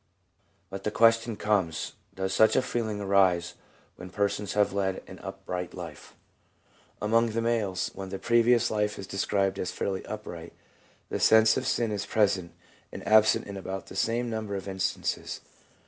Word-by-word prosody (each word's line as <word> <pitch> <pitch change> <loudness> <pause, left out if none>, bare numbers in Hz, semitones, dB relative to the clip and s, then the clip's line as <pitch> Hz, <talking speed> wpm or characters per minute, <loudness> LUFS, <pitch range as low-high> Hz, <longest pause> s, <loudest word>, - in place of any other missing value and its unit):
But 95 0 -6
the - - 0
question 115 +1 +3
comes, 100 -6 0 0.2
Does 95 0 -2
such 110 +3 +5
a 130 - +3
feeling 110 -4 -2
arise 95 -4 +3 0.4
when 90 - -9
persons 100 +1 -1
have 105 -1 +2
led 95 -1 -1
an - - -11
upright 90 -1 -6
life? - - -9 0.8
Among 115 +2 +2
the 115 - 0
males, 110 -5 0
when 95 -1 -7
the 95 - -4
previous 120 +3 +3
life 105 -1 0
is 95 - -6
described 100 0 0
as 90 - -2
fairly 95 +1 -3
upright, 85 -6 -7 0.6
the - - -2
sense 110 0 +6
of 130 -1 -2
sin 115 -3 +1
is 100 -1 -3
present 95 -5 +1 0.4
and - - -8
absent 110 0 +5
in 100 - -7
about 95 0 -5
the - - -11
same 120 +2 0
number 110 -3 -3
of 95 0 -5
instances. 95 -1 -2
100 Hz, 165 wpm, -28 LUFS, 95-110 Hz, 0.8 s, sense